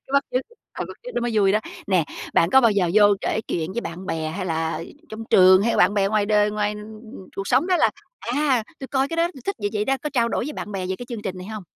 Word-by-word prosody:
cái 270 - -15
bắt 280 - +4
chước 255 - +2 0.3
ờ, - - -4
bắt - - -9
chước - - -8
nó - - 0
mới 240 0 -1
vui 200 -2 +4
đó. 215 - +2 0.3
Nè, 185 -5 +2 0.3
bạn 165 - +4
có 265 - +7
bao 230 - +5
giờ 195 -4 +1
vô 215 - +6 0.2
kể 215 - -1
chuyện 165 +2 -2
với 235 - -2
bạn 180 0 -7
bè, 160 -1 -2
hay 185 +2 -4
là 160 -1 -2 0.3
trong 220 +1 -7
trường, 185 +1 +7
hay 230 - +1
là - - 0
bạn 185 +3 +4
bè 195 -1 +2
ngoài 210 0 +1
đời, 210 0 +3
ngoài 210 0 -1 0.6
cuộc 195 - -4
sống 260 +7 +3
đó 370 -1 +3
là, - - +3 0.3
à, 260 -1 +1 0.2
tui 265 - -5
coi 270 0 0
cái 330 - -4
đó 335 +1 +2
tui 270 - -11
thích 395 - -2
vậy 205 -1 -1
vậy 210 -1 0
đó, 270 +4 +1
có 300 - -3
trao 235 -3 +2
đổi 235 - -1
với 300 - -4
bạn 210 - -6
bè 185 -2 -3
về 190 - -2
cái 245 - -8
chương 235 -4 -6
trình 185 -2 -4
này 185 - -8
hông? 215 -1 -6
210 Hz, 295 wpm, -23 LUFS, 190-255 Hz, 0.6 s, có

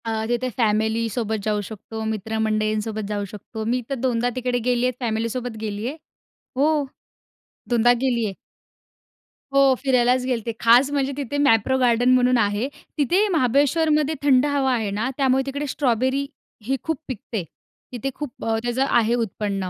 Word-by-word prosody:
अ, 220 -1 -2
तिथे 240 +1 0
फॅमिलीसोबत 220 0 0
जाऊ 210 -1 0
शकतो. 220 +2 -7
मित्रमंडळींसोबत 215 0 -1
जाऊ 205 -1 -2
शकतो. 215 +1 -7
मी 245 +3 0
तर 275 - -1
दोनदा 245 0 +1
तिकडे 250 -1 -1
गेली 245 0 +2
आहे. 255 - +2
फॅमिलीसोबत 230 0 -2
गेली 210 +1 -3
आहे. 290 +5 -5 0.6
हो. 295 +2 +2 0.9
दोनदा 240 0 +4
गेली 240 -4 +1
आहे. 200 - -3 1.2
हो. 275 -1 +5
फिरायलाच 255 -1 +3
गेले 255 -1 +1
होते. 230 +1 -4
खास 245 +5 +5
म्हणजे 280 -1 0
तिथे 285 0 -3
मॅप्रो 245 0 +3
गार्डन 245 0 +3
म्हणून 250 0 +4
आहे. 205 +2 +1 0.3
तिथे 355 - +2
महाबळेश्वरमध्ये 300 +3 +2
थंड 270 -1 +4
हवा 280 -3 +1
आहे 220 -4 -1
ना. 215 +5 -1
त्यामुळे 265 -1 +2
तिकडे 285 +2 -3
स्ट्रॉबेरी 260 +1 0 0.4
ही 270 +3 0
खूप 320 -2 -1
पिकते. 225 -4 -4 0.5
तिथे 250 +2 -3
खूप 295 -5 -7
अ, 225 0 +1
त्याचं 245 +2 0
आहे 230 0 +3
उत्पन्न. 195 -2 -3
245 Hz, 150 wpm, -23 LUFS, 220-265 Hz, 1.2 s, हो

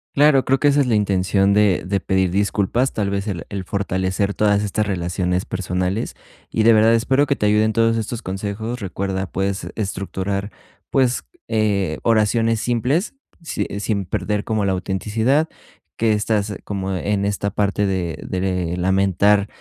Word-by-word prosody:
Claro, 145 -2 +5
creo 135 0 +2
que 145 - +3
esa 145 +1 +3
es 135 - +1
la 115 - +2
intención 100 -1 +2
de 105 -3 +3
de 100 +2 0
pedir 95 -1 +1
disculpas, 105 +6 +1
tal 100 -2 -1
vez 100 +1 -2
el 90 -6 -4
el 100 -2 -4
fortalecer 95 +1 -1
todas 105 -1 +2
estas 105 +1 -1
relaciones 90 -1 -1
personales. 95 +3 -2 0.3
Y 110 - 0
de 115 +1 +7
verdad 110 +1 +5
espero 130 +5 +2
que 140 - +1
te 105 - -1
ayuden 105 +1 +3
todos 115 0 +3
estos 115 +1 -3
consejos. 105 +5 -4
Recuerda, 95 -1 -3
puedes 95 +1 -2
estructurar, 100 0 -3 0.4
pues, 130 -2 +1 0.2
eh, 100 -7 0
oraciones 115 0 +2
simples, 125 - 0 0.3
si, 165 - -3
eh, 100 - -4
sin 100 -2 -1
perder 105 +4 -2
como 110 -2 -1
la 95 - +1
autenticidad 110 - 0 0.5
que 110 -1 +2
estás 105 -1 0
como 95 -2 -3
en 100 +2 -1
esta 100 0 -1
parte 100 0 0
de 90 -4 -2
de 90 -2 -1
lamentar 95 +2 +3
100 Hz, 160 wpm, -21 LUFS, 95-110 Hz, 0.5 s, de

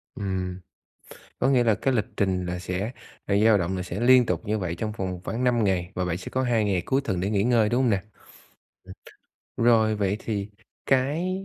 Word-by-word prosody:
Ừm. 95 -2 -3 0.8
Có 135 - +2
nghĩa 125 -3 +4
là 110 -3 +3
cái 135 +4 0
lịch 110 -4 +1
trình 95 -2 0
là 90 0 -4
sẽ 95 +4 -3 0.4
là 100 - +1
dao 110 -2 +6
động 95 +1 -2
là 90 - -3
sẽ 90 +3 -5
liên 125 +1 +6
tục 90 -6 -1
như 110 +1 0
vậy 85 -2 -3
trong 110 +4 -3
vòng 95 -4 -4
khoảng 120 +3 -3
5 120 -3 +2
ngày, 95 -2 0
và 90 0 -1
bạn 90 0 -2
sẽ - - -8
có 130 0 0
2 115 -3 +1
ngày 95 -3 +1
cuối 135 +1 +1
tuần 95 -9 -2
để 95 +3 -1
nghỉ 100 -1 +1
ngơi, 115 -3 +3
đúng 120 +3 +1
hông 125 - +2
nè? 95 -2 +1 1.6
Ừm, 115 - 0
rồi, 110 -2 +4
vậy 100 -1 0
thì 105 -2 -3 0.4
cái 160 +9 0
105 Hz, 220 wpm, -25 LUFS, 95-120 Hz, 1.6 s, dao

